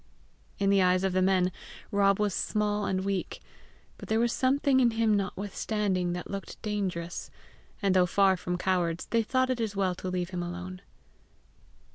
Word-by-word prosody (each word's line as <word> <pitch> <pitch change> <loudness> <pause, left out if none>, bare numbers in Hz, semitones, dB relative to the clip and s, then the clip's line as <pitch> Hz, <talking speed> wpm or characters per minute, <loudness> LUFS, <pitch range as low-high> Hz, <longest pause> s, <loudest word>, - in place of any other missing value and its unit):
In 195 0 +2
the 200 -1 +4
eyes 185 0 +3
of 190 -1 +1
the 185 - +2
men 185 -1 +3 0.4
Rob 200 -1 +3
was 210 -3 +1
small 210 +1 0
and 190 0 -1
weak; 195 -2 -2 0.6
but - - -10
there 220 +1 +2
was 235 0 +2
something 270 +1 +2
in 245 -2 +5
him 225 -2 +3
notwithstanding 195 -1 -1
that 175 - -6
looked 195 0 -6
dangerous, 185 -5 -3 0.5
and, 195 -1 +3
though 180 -1 +5
far 195 +1 +4
from 180 0 -3
cowards, 175 -2 0
they 230 - +3
thought 255 +3 +1
it 245 -2 -1
as 215 -3 -2
well 190 -2 +1
to 185 +1 -5
leave 180 0 -2
him 180 -1 -3
alone. 180 +1 -6
195 Hz, 175 wpm, -28 LUFS, 180-210 Hz, 0.6 s, in